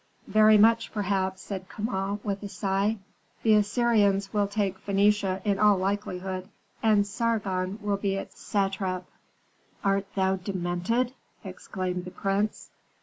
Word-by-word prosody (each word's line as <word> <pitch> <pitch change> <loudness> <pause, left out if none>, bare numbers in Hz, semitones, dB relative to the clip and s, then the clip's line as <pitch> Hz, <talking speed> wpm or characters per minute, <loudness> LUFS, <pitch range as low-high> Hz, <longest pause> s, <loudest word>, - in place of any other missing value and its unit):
"Very 215 0 +6
much, 230 +2 +4
perhaps," 190 -2 -1
said 190 -2 -6
Kama, 200 -2 -2
with 200 -1 -2
a 205 - -6
sigh. 200 +2 0 0.5
"The 220 - +5
Assyrians 205 -2 +2
will 205 -1 +2
take 200 -2 -2
Phœnicia 200 -1 +2
in 200 -2 +1
all 210 -1 +5
likelihood, 185 -1 -3 0.3
and 210 -2 +4
Sargon 200 -3 -1
will 205 -1 0
be 195 -1 -1
its 195 - -7
satrap." 195 -2 -1 0.8
"Art 195 0 +1
thou 190 0 +2
demented?" 185 +6 -1 0.3
exclaimed 185 -1 -4
the - - -6
prince. 195 +3 -2
200 Hz, 130 wpm, -27 LUFS, 190-210 Hz, 0.8 s, Very